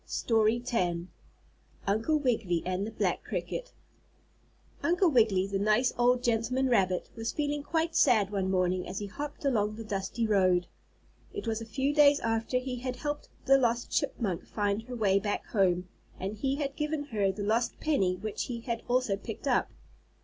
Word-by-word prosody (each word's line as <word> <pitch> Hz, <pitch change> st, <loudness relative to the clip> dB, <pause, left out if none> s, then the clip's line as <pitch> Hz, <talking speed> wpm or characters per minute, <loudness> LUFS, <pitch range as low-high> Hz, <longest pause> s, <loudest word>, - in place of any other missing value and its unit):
STORY 225 Hz, 0 st, +2 dB
X 250 Hz, -, -5 dB, 1.1 s
UNCLE 225 Hz, +10 st, +1 dB
WIGGILY 225 Hz, -, 0 dB
AND 185 Hz, +3 st, -1 dB
THE -, -, -6 dB
BLACK -, -, -1 dB
CRICKET -, -, -4 dB, 1.1 s
Uncle 350 Hz, 0 st, +3 dB
Wiggily, 215 Hz, -7 st, +4 dB
the 195 Hz, 0 st, -2 dB
nice 215 Hz, +5 st, +2 dB
old 245 Hz, +1 st, +3 dB
gentleman 245 Hz, +3 st, +1 dB
rabbit, 185 Hz, -6 st, +1 dB
was 225 Hz, 0 st, -3 dB
feeling 290 Hz, -1 st, -1 dB
quite 325 Hz, +2 st, -1 dB
sad 215 Hz, -7 st, +4 dB
one 195 Hz, -2 st, -1 dB
morning 185 Hz, -1 st, +1 dB
as 185 Hz, -, -5 dB
he 205 Hz, -, -3 dB
hopped 285 Hz, +9 st, -6 dB
along 215 Hz, -6 st, +1 dB
the 225 Hz, -, -7 dB
dusty 210 Hz, +2 st, -2 dB
road. 185 Hz, -4 st, +3 dB, 0.7 s
It -, -, -4 dB
was 225 Hz, 0 st, -1 dB
a -, -, -5 dB
few 270 Hz, +5 st, -1 dB
days 290 Hz, -1 st, +6 dB
after 225 Hz, +2 st, 0 dB
he 250 Hz, 0 st, -3 dB
had 255 Hz, +1 st, -4 dB
helped 290 Hz, +3 st, -4 dB, 0.2 s
the 270 Hz, 0 st, +6 dB
lost 240 Hz, -1 st, 0 dB
chipmunk 190 Hz, -8 st, -1 dB
find 205 Hz, 0 st, -1 dB
her 250 Hz, +2 st, -8 dB
way 200 Hz, -4 st, +3 dB
back 205 Hz, +1 st, -2 dB
home, 185 Hz, -3 st, +1 dB, 0.3 s
and 195 Hz, +3 st, -3 dB
he 270 Hz, +5 st, -1 dB
had 280 Hz, -1 st, -3 dB
given 300 Hz, 0 st, -2 dB
her 200 Hz, -2 st, +2 dB
the 205 Hz, +2 st, -5 dB
lost 225 Hz, +4 st, 0 dB
penny 195 Hz, -13 st, +1 dB
which 210 Hz, +3 st, -4 dB
he 235 Hz, -2 st, -5 dB
had 235 Hz, -1 st, -3 dB
also 245 Hz, -4 st, +2 dB
picked 195 Hz, -, -7 dB
up. -, -, +2 dB
225 Hz, 175 wpm, -29 LUFS, 200-260 Hz, 1.1 s, days